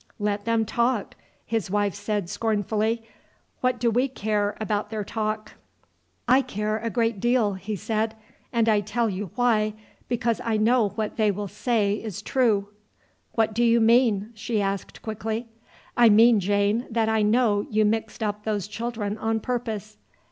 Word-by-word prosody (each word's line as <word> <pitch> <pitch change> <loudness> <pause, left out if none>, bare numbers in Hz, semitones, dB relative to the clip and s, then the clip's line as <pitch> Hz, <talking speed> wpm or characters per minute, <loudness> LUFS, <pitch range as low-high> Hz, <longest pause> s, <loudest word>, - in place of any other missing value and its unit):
"Let 205 -1 -2
them 230 -1 +2
talk!" 235 0 0 0.3
his 225 -4 -2
wife 205 0 +1
said 205 -2 -2
scornfully. 215 +2 0 0.6
"What 250 -1 0
do 235 0 +2
we 250 +4 +2
care 210 -4 -1
about 210 -1 -1
their 215 -1 -3
talk!" 215 0 -3 0.8
"I 255 +2 +6
care 215 -2 -2
a 230 +1 -2
great 230 -3 0
deal," 240 -2 +2
he 200 +3 -5
said. 220 +2 -1 0.4
"And 230 -2 +2
I 215 -2 +4
tell 215 +2 -1
you 190 0 -4
why, 220 -4 +2 0.3
because 235 -1 0
I 225 -2 0
know 225 0 +3
what 215 -2 -3
they 215 -2 +3
will 205 +1 -2
say 210 0 0
is 205 -3 -6
true." 215 -7 +1 0.6
"What 225 -1 +1
do 235 +2 +1
you 235 0 +5
mean?" 225 -2 +3
she 220 0 -2
asked 195 -1 -3
quickly. 220 +2 -4 0.5
"I 240 -1 +6
mean, 225 +1 +6
Jane, 205 +4 +1
that 225 -1 +1
I 220 -1 +2
know 210 -1 +2
you 215 0 +2
mixed 220 +1 -1
up 210 0 -2
those 210 -3 -2
children 215 -1 -4
on 225 0 0
purpose." 220 -3 -4
220 Hz, 160 wpm, -25 LUFS, 205-230 Hz, 0.8 s, I